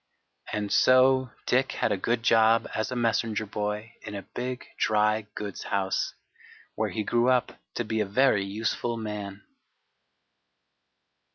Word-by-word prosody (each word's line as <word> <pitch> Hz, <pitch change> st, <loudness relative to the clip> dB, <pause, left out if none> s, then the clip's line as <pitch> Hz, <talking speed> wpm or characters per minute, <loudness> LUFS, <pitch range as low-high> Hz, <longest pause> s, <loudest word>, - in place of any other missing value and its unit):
And 105 Hz, -1 st, -2 dB
so 130 Hz, 0 st, +5 dB, 0.2 s
Dick 130 Hz, +2 st, +2 dB
had -, -, 0 dB
a -, -, +3 dB
good 115 Hz, +4 st, -1 dB
job 115 Hz, 0 st, +4 dB
as 110 Hz, +2 st, -2 dB
a -, -, -2 dB
messenger 115 Hz, -2 st, 0 dB
boy 105 Hz, +2 st, -4 dB
in 105 Hz, -, -7 dB
a 100 Hz, -, -5 dB
big 125 Hz, +1 st, -5 dB
dry 105 Hz, 0 st, +2 dB
goods 100 Hz, -2 st, -5 dB
house, 95 Hz, -1 st, -1 dB, 0.6 s
where -, -, -1 dB
he 110 Hz, -, -3 dB
grew 120 Hz, +4 st, +2 dB
up 125 Hz, -1 st, +1 dB, 0.2 s
to 120 Hz, -, -2 dB
be 110 Hz, 0 st, -1 dB
a 105 Hz, -, 0 dB
very 105 Hz, -1 st, +3 dB
useful 110 Hz, +4 st, -2 dB
man. 105 Hz, -2 st, -6 dB
110 Hz, 145 wpm, -27 LUFS, 105-120 Hz, 0.6 s, so